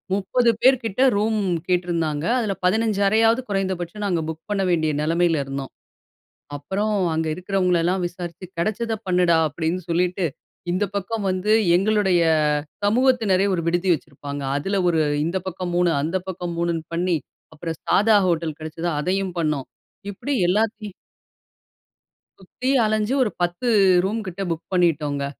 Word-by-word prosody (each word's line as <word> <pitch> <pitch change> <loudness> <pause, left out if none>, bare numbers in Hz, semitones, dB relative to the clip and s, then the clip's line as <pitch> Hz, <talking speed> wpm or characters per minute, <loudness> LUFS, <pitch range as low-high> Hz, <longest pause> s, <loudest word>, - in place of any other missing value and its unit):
30 235 +5 +1
பேர் 260 +1 +6
கிட்ட 225 +2 -2
ரூம் 215 +1 +1 0.3
கேட்டிருந்தாங்க, 170 -4 0
அதுல 215 -4 -1
15 215 +2 +1
அறையாவது 225 +4 +3
குறைந்தபட்சம் 190 0 -2
நாங்க 180 -4 0
புக் 160 0 -6
பண்ண 205 -1 0
வேண்டிய 160 -3 +1
நிலைமையில 165 0 +1
இருந்தோம். 135 0 -5 0.8
அப்புறம், 195 +9 -2 0.2
அங்க 160 0 -1
இருக்கிறவங்களயெல்லாம் 180 0 0
விசாரிச்சு, 175 0 -8
"கிடைச்சத 220 +6 -1
பண்ணுடா." 180 -2 +3
அப்படின்னு 160 +4 -2
சொல்லிட்டு, 180 +2 0 0.5
இந்த 185 +4 +1
பக்கம் 205 +2 -3
வந்து 185 +3 0 0.2
எங்களுடைய 195 -2 +2 0.6
சமூகத்தினரே 220 -4 +3
ஒரு 175 - 0
விடுதி 175 +2 +1
வைச்சிருப்பாங்க. 145 -2 -6
அதுல 195 +6 -1
ஒரு 165 -2 +1 0.3
இந்த 170 +3 -1
பக்கம் 180 -1 -4
3, 175 -1 +3
அந்த 165 +6 -1
பக்கம் 180 -2 -4
3ன்னு 170 -1 -1
பண்ணி, 175 0 +1 0.4
அப்புறம் 160 0 -5
சாதா 210 +1 +4
ஹோட்டல் 165 -3 -1
கிடைச்சது 160 +2 -4
அதையும் 185 +3 -1
பண்ணோம். 150 -5 -1 0.4
இப்படி 280 +8 -4 0.2
எல்லாத்தி 215 +2 0 1.5
சுத்தி 195 +7 -6 0.2
அலஞ்சு, 215 +2 0
ஒரு 230 - +1
10 175 +8 -1 0.4
ரூம் 215 +4 -1
கிட்ட 185 +1 -5
புக் 165 -1 -3
பண்ணிட்டோங்க. 150 -6 +1
180 Hz, 130 wpm, -22 LUFS, 165-205 Hz, 1.5 s, பேர்